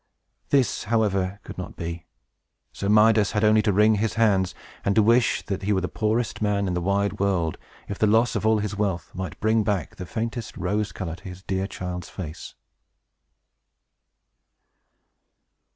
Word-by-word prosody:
This, 135 -6 +2
however, 100 -3 0
could - - -9
not - - -6
be. 85 0 -6 0.7
So 100 - -3
Midas 105 0 +5
had 105 0 +1
only 110 0 +5
to 105 0 +1
wring 105 +2 +4
his 110 - -1
hands, 95 -6 +2 0.3
and 100 - +1
to 110 - +5
wish 115 +2 +3
that 100 -4 -3
he 100 +2 +1
were 95 - +1
the 90 - -1
poorest 110 +3 -1
man 100 -2 +1
in 90 - -1
the 90 - -1
wide 100 +2 0
world, 95 -5 0 0.3
if 100 - -5
the 110 - +4
loss 110 +3 +3
of - - -1
all 110 0 +4
his 105 -1 -2
wealth 95 -5 -2
might 95 -4 -6
bring 110 0 +2
back 100 -5 -2
the 90 - -7
faintest 115 +2 -4
rose 105 0 -1
color 85 -3 -5
to - - -20
his 90 0 -9
dear 95 0 -2
child's 90 -2 -6
face. 80 -4 -8
100 Hz, 170 wpm, -25 LUFS, 95-110 Hz, 0.7 s, Midas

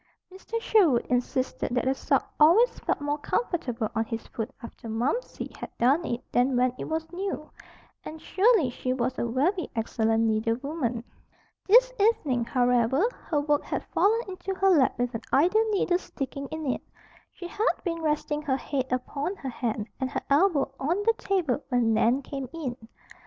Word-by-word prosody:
Mr. 450 +4 -5
Sherwood 365 - +3
insisted 250 0 -1
that 250 - 0
a 265 - +3
sock 270 - -1
always 355 +12 +5
felt - - -1
more 290 +1 -1
comfortable 260 - -1
on 225 0 +1
his 225 0 -5
foot 225 +1 -5
after 230 0 -9
"Momsey" 250 - -2
had - - -7
darned 275 +8 +3
it 240 +1 -3
than 250 +1 +2
when 250 0 +2
it - - -4
was 320 0 -3
new. 365 -4 -4 0.5
And 315 - -8
surely 385 - +3
she 255 +1 -2
was 255 0 -2
a 235 - 0
very 310 - 0
excellent 225 0 +1
needlewoman. 230 +3 -1 0.6
This - - +6
evening, 295 - +2
however, 245 - +2 0.2
her 295 -3 +1
work 290 0 +1
had - - -4
fallen 445 +3 +3
into 380 0 -5
her 385 +1 +3
lap 290 -7 +3
with 245 0 -1
an 225 - -4
idle 395 +10 +3
needle 370 -4 +1
sticking 275 -4 -6
in 315 +1 -5
it. 260 - -1 0.5
She 350 - -8
had 425 +6 +1
been 335 -2 -2
resting 300 -1 -1
her 275 -3 0
head 265 -2 -3
upon 280 +8 -2
her 270 - -6
hand 230 -3 -3
and 260 - -1
her - - -3
elbow 290 -3 +3
on 320 +7 0
the 455 +2 +4
table 325 -9 0
when 240 -3 +2
Nan 240 +5 +2
came 275 -2 -6
in. 290 -7 -4
280 Hz, 175 wpm, -27 LUFS, 245-350 Hz, 0.6 s, This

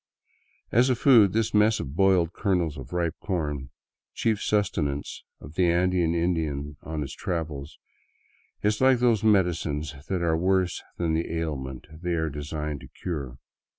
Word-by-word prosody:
As 120 +4 +4
a 130 - +3
food, 115 -6 +6
this 110 +1 0
mess 105 +1 +4
of 70 +2 -5
boiled 90 -2 +3
kernels 90 -7 0
of 65 -3 -9
ripe 85 -2 0
corn, 75 -8 -3 0.5
chief 110 -2 0
sustenance 75 -9 -1 0.2
of 75 - -11
the 90 0 +3
Andean 85 -1 +2
Indian 80 -4 -1
on 80 0 -4
his 70 - -7
travels, 75 -4 -4 0.9
is 105 +2 +1
like 130 -1 +6
those 120 -4 +2
medicines 85 -8 +1 0.2
that 90 -3 0
are 80 -1 +2
worse 90 +1 +1 0.2
than 85 -2 0
the 80 +1 -1
ailment 70 -6 -4 0.2
they 90 -1 -1
are 80 -2 -1
designed 75 0 -4
to - - -11
cure. 70 -8 -5
85 Hz, 150 wpm, -26 LUFS, 75-95 Hz, 0.9 s, food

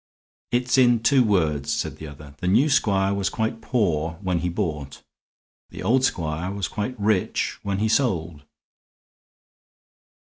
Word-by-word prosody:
"It's 125 +2 +1
in 120 -3 +4
two 135 0 +4
words," 75 - +1
said - - -2
the 80 - -8
other. 75 0 -12
"The 90 - -3
new 135 +11 +3
squire 100 -6 +2
was 100 -1 -1
quite 110 +1 -3
poor 85 -9 0
when 90 -2 0
he 90 +1 -1
bought. 75 -7 -4 0.7
The - - -8
old 130 +3 +2
squire 85 -5 -1
was 100 -2 -3
quite 110 +3 -4
rich 105 -2 0
when 100 -1 -2
he 110 +2 +1
sold." 85 - 0
95 Hz, 145 wpm, -24 LUFS, 80-115 Hz, 0.7 s, in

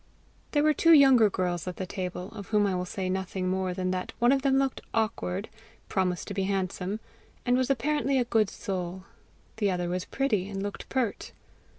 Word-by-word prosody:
There 290 -1 +3
were 305 0 +5
two 330 +2 +5
younger 265 -7 +7
girls 180 -2 -2
at 180 - -3
the 190 - -4
table, 180 0 -5
of 205 -3 -9
whom 210 -1 +3
I 195 - +1
will 180 0 -1
say 185 0 -3
nothing 190 0 -2
more 185 0 0
than 185 0 -1
that 185 0 -3
one 240 +2 +4
of 275 0 +3
them 270 -1 +3
looked 270 -1 0
awkward, 215 -3 -1 0.4
promised 180 -2 0
to - - -3
be 195 -1 -1
handsome, 195 +1 -2 0.5
and 245 0 +3
was 255 +1 +1
apparently 275 +1 +1
a 250 - +2
good 220 -4 +2
soul; 185 -2 -4 0.5
the 210 -2 +1
other 180 -2 -1
was 180 +1 -2
pretty, 210 -9 0
and 195 -1 -4
looked 205 0 -6
pert. 255 -5 -2
200 Hz, 200 wpm, -28 LUFS, 185-245 Hz, 0.5 s, younger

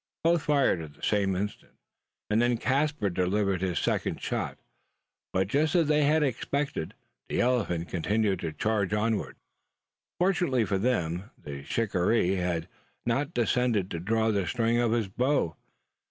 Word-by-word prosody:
Both 165 0 +3
fired 140 - +3
at 75 -2 -9
the - - -21
same 100 -2 +1
instant; 100 +3 -4 0.6
and 110 +2 +3
then 120 0 +2
Caspar 135 -4 0
delivered 95 +1 0
his 90 -2 -1
second - - 0
shot; - - -3 0.7
but, 95 0 +1
just 150 - +1
as 165 -4 +4
they 150 -1 +3
had 155 +1 +3
expected, 140 - -2 0.3
the - - -1
elephant 100 -9 +1
continued 100 +2 0
to 80 -2 -3
charge 105 +3 0
onward. 110 0 -1 0.8
Fortunately 175 - +2
for 95 -2 0
them, 95 -4 -1
the 70 -1 -8
shikaree 95 0 +1
had 90 -2 -1 0.4
not 135 +5 0
condescended 120 -4 +1
to 85 - -3
draw 110 +5 +1
the 100 -4 0
string 115 +2 +1
of 120 -2 +2
his 115 -3 +1
bow. 125 - 0
110 Hz, 150 wpm, -28 LUFS, 95-125 Hz, 0.8 s, as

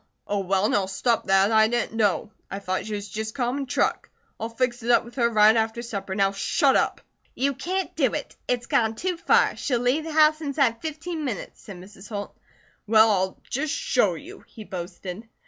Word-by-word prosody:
"Oh, 205 - -1
well, 195 +1 +1
now 200 -3 +1
stop 225 +4 0
that. 195 +2 +4
I 220 0 +5
didn't 240 -1 -1
know. 210 -1 +1 0.2
I 195 - -4
thought 185 0 -3
she 215 - -3
was 205 0 -5
just 220 +1 -5
common 265 +1 -1
truck. - - 0 0.3
I'll 225 - -3
fix 240 +1 -1
it 230 - -5
up 240 - +4
with 235 - -12
her 235 -3 +2
right 215 -1 +5
after 225 +1 0
supper. 200 -5 -5
Now 195 -1 +2
shut 265 - +2
up." - - +1 0.3
"You 280 +2 +1
can't 370 +8 -3
do - - +2
it! - - -5
It's 245 -1 -1
gone 220 -1 +1
too 365 +9 -2
far. 335 - +3
She'll 255 -4 0
leave 250 +6 +1
the 325 - -5
house 310 0 +4
inside 275 -6 0
fifteen 320 +1 -5
minutes," 235 -9 -5
said 195 -3 -10
Mrs. 195 +2 -13
Holt. 205 -2 -6 0.5
"Well, 220 +1 +6
I'll 190 -1 0
just 280 +3 -2
show - - +1
you," - - -10
he 220 - -11
boasted. 185 +2 -7
225 Hz, 200 wpm, -25 LUFS, 200-260 Hz, 0.5 s, Well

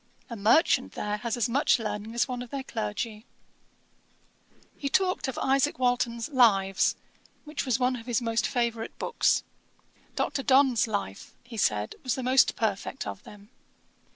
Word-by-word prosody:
A - - -4
merchant 225 - +3
there 210 0 -3
has 235 +2 -3
as 240 - +1
much 265 +5 +3
learning 215 0 -5
as 240 - +2
one 250 -2 -4
of 245 - -8
their 275 +1 -4
clergy.' 215 - -4 1.5
He 280 - -3
talked 365 0 +1
of 265 - -4
Isaac 275 +2 +1
Walton's 245 -2 0
Lives, 200 -8 +3 0.5
which 300 -2 -4
was 245 -3 +2
one 250 0 +1
of 230 0 -11
his 240 -2 +1
most 230 -2 0
favourite 235 -2 -2
books. 480 - +1 0.7
Dr. 275 - -1
Donne's 265 -3 +4
Life, 200 - -5
he 235 0 -11
said, 105 - 0
was 255 -3 -1
the 260 - -4
most 260 +1 +4
perfect 220 +4 -2
of 205 - -6
them. 205 0 -14
235 Hz, 155 wpm, -27 LUFS, 215-260 Hz, 1.5 s, Donne's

